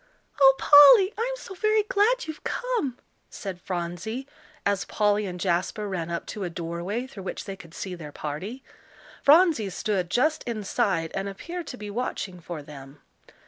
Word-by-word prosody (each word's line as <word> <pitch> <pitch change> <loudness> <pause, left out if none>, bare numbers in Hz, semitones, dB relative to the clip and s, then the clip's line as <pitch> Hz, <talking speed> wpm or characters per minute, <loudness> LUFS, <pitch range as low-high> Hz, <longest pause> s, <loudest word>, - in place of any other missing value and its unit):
"Oh, 270 -1 +8
Polly, 295 +8 +8
I'm 485 +3 -1
so 385 - -9
very 430 +3 +2
glad 435 +5 +2
you've 315 -1 -8
come," 455 - -2 0.3
said 190 -4 -7
Phronsie, 180 +9 -4 0.4
as 200 -1 +1
Polly 210 -1 +1
and 180 -1 -6
Jasper 185 +4 -1
ran 175 -4 -3
up 170 0 -3
to 205 - -5
a 180 - -2
doorway 170 +7 -4
through 240 -7 -10
which 190 - -5
they 195 - -5
could 170 -3 -14
see 190 - -5
their 160 -4 -8
party. 185 - -6 0.6
Phronsie 300 - +5
stood 190 -2 -2
just 310 - +2
inside, 205 -6 -1
and 195 +1 -2
appeared 340 - -7
to 250 - -7
be 210 -2 -7
watching 200 -5 -4
for 165 -3 -7
them. 140 -1 -12
205 Hz, 165 wpm, -26 LUFS, 175-280 Hz, 0.6 s, Oh